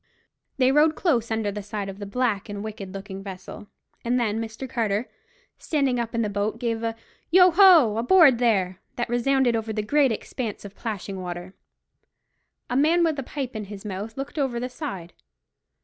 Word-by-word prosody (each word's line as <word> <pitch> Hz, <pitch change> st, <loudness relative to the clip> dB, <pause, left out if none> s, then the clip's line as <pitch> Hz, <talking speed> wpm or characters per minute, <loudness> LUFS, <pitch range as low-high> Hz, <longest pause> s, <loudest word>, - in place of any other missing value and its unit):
They 260 Hz, -1 st, +4 dB
rowed 305 Hz, +2 st, +4 dB
close 245 Hz, -, +1 dB
under 220 Hz, -2 st, -1 dB
the 210 Hz, +1 st, -5 dB
side 205 Hz, 0 st, -5 dB
of 195 Hz, 0 st, -8 dB
the 205 Hz, -, -6 dB
black 220 Hz, -2 st, -1 dB
and 205 Hz, 0 st, -5 dB
wicked 210 Hz, -3 st, -7 dB
looking 195 Hz, 0 st, -7 dB
vessel, 195 Hz, +1 st, -9 dB, 0.4 s
and 245 Hz, +1 st, +1 dB
then 220 Hz, -2 st, 0 dB
Mr. 225 Hz, +4 st, -6 dB
Carter, 225 Hz, -2 st, -1 dB, 0.5 s
standing 275 Hz, -5 st, 0 dB
up 230 Hz, -1 st, -3 dB
in 230 Hz, -, +1 dB
the -, -, 0 dB
boat 205 Hz, +2 st, -2 dB
gave 230 Hz, -2 st, -1 dB
a 230 Hz, -1 st, -2 dB, 0.3 s
"Yo 365 Hz, +1 st, +7 dB
ho! 335 Hz, -, +6 dB
aboard 265 Hz, +1 st, +6 dB
there!" 190 Hz, -6 st, +1 dB, 0.2 s
that 240 Hz, -1 st, -2 dB
resounded 245 Hz, 0 st, +2 dB
over 225 Hz, 0 st, -2 dB
the 215 Hz, -1 st, -2 dB
great 280 Hz, +3 st, +3 dB
expanse 220 Hz, -1 st, -5 dB
of 200 Hz, -, -9 dB
plashing 200 Hz, -4 st, -5 dB
water. 175 Hz, +1 st, -6 dB, 1.1 s
A 245 Hz, -, -3 dB
man 320 Hz, +6 st, +4 dB
with 315 Hz, -4 st, +1 dB
a -, -, -1 dB
pipe 265 Hz, -1 st, -5 dB
in 215 Hz, -1 st, -4 dB
his 200 Hz, +1 st, -10 dB
mouth 210 Hz, +3 st, -5 dB
looked 275 Hz, +3 st, -5 dB
over 260 Hz, -4 st, 0 dB
the 250 Hz, +1 st, -3 dB
side. 245 Hz, -, -6 dB
230 Hz, 185 wpm, -25 LUFS, 205-265 Hz, 1.1 s, Yo